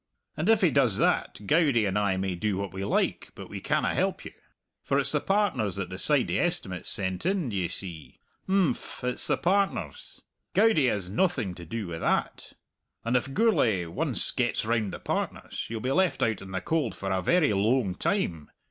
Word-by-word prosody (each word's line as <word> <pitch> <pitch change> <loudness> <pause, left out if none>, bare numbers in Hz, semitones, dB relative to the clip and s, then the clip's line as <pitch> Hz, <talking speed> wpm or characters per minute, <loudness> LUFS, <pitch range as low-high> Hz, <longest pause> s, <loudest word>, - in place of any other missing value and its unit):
And 160 +7 -1
if 225 -2 +5
he 180 -5 +4
does 125 -8 +3
that, 105 - 0
Goudie 140 - +3
and 95 -1 -1
I 100 -2 +1
may 95 0 -1
do 95 +2 -1
what 100 -2 -4
we 95 +1 -4
like, 100 - 0
but - - -10
we - - -6
canna - - 0
help - - -1
you. - - -7 0.5
For 140 - 0
it's 140 -1 +1
the 150 - +2
partners 185 - 0
that 100 -3 -4
decide 130 +8 +3
the - - 0
estimates 170 - -1
sent 95 -2 0
in, 185 -5 0
d'ye 95 -5 -1
see? 85 -3 -8 0.3
Imphm, 190 -8 0
it's 125 0 -1
the - - +1
partners. 170 - -1 0.3
Goudie 195 -9 +4
has 100 -5 -2
noathing 110 - 0
to 85 -1 -10
do 115 +3 -4
wi' 80 -1 -5
that. - - -1 0.5
And 120 +2 0
if 125 +2 0
Gourlay 120 - +2
once 85 - +2
gets - - 0
round 110 -3 0
the - - -6
partners, - - -4
you'll 115 -1 -4
be 130 - -1
left 185 +3 +2
out 110 -3 0
in 95 - -10
the 95 -1 -3
cold 150 - -1
for 95 0 -4
a 95 -1 0
very 170 - +3
loang 105 0 +1
time. 85 - -1
115 Hz, 195 wpm, -27 LUFS, 95-160 Hz, 0.5 s, if